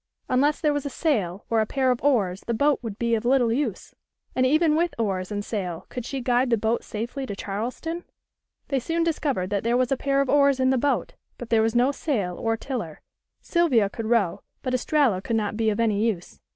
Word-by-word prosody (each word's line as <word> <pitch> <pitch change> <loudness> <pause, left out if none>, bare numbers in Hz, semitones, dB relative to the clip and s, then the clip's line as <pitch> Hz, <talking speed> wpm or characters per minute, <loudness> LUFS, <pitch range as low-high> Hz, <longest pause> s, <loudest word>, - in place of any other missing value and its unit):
Unless 285 +4 +2
there 300 -2 +2
was 290 -1 -2
a - - -3
sail 210 - -1
or 225 -1 +2
a 215 - -1
pair 260 0 +1
of 250 - -2
oars 205 -10 +2
the 235 - 0
boat 285 +4 +2
would 220 -4 -6
be 235 0 0
of 220 - +1
little 245 -2 +3
use, 245 -6 -3 0.4
and 255 0 +3
even 310 +2 +3
with 340 +2 +1
oars 195 -4 -2
and 205 0 -3
sail 180 -6 -4
could 250 -2 -6
she 270 -2 -3
guide 245 +1 +2
the 230 - +3
boat 220 +2 0
safely 240 +5 -5
to 200 - -4
Charleston? 245 - -4 0.7
They 275 - +1
soon 330 +7 -1
discovered 280 - -1
that 200 -1 0
there 235 +2 +2
was 255 0 +1
a 270 - +2
pair 275 +1 +1
of 275 - +2
oars 280 -1 +4
in 260 0 +3
the 265 - +2
boat, 285 +3 0 0.2
but 240 -1 -9
there 225 -1 +5
was 225 +1 +1
no 250 +3 +4
sail 215 - -2
or 225 +3 -1
tiller. 220 - -5 0.4
Sylvia 260 - +2
could 225 0 -5
row, 215 -7 +1 0.2
but 255 - -2
Estralla 255 -6 +2
could 230 - -2
not 215 -1 -1
be 220 0 +1
of 210 +1 -1
any 215 -2 +2
use. 205 -7 -2
240 Hz, 225 wpm, -25 LUFS, 215-275 Hz, 0.7 s, there